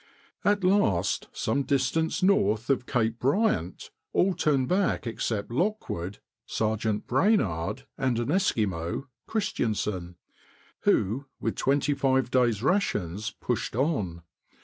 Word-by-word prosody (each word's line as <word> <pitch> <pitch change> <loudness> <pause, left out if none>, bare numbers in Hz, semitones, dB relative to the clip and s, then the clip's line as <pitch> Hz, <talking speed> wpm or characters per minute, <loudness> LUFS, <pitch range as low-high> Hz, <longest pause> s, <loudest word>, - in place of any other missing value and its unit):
At 205 -1 +2
last, 180 - +2
some 140 - 0
distance 140 +6 0
north 115 - +3
of 130 -2 0
Cape 115 -2 0
Bryant, 135 - 0 0.2
all 190 +1 +3
turned 140 -6 +1
back 185 -5 +1
except 115 -2 -2
Lockwood, 120 - -2 0.3
Sergeant 110 -1 -1
Brainard, 130 - +1
and 130 -3 +1
an 120 +2 -1
Eskimo, 105 - 0 0.2
Christiansen, 105 - -2 0.7
who, 125 +9 +2
with - - -1
twenty 140 +1 +1
five 130 -2 +1
days' 120 -4 +2
rations, 110 - 0
pushed 120 -3 -2
on. 105 - -1
125 Hz, 110 wpm, -27 LUFS, 105-150 Hz, 0.7 s, north